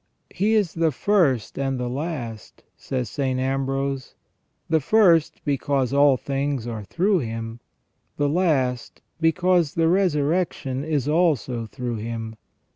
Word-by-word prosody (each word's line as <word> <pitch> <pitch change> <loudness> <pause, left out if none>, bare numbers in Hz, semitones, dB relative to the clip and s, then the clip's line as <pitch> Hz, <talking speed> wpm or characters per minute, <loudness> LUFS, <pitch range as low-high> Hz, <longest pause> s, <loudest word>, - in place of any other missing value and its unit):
" - - -48
He 215 +3 +1
is 200 -7 +1
the 165 -1 +1
first 145 - +1
and 135 -1 -1
the 125 - -2
last," 125 - -5
says 125 -3 -3
St. 130 -3 -2
Ambrose: 135 0 -2 0.3
" - - -48
the 160 -1 +3
first 170 -1 +3
because 140 -2 0
all 140 -1 +5
things 140 -2 -2
are 115 -2 -4
through 185 - +1
Him, 115 -2 -5 0.6
the 145 - +1
last 140 -7 0 0.2
because 170 -1 +2
the 165 -1 +3
resurrection 160 -6 0
is 145 -4 -1
also 145 - +1
through 120 +1 -4
Him. 115 0 -5
140 Hz, 135 wpm, -23 LUFS, 125-165 Hz, 0.6 s, all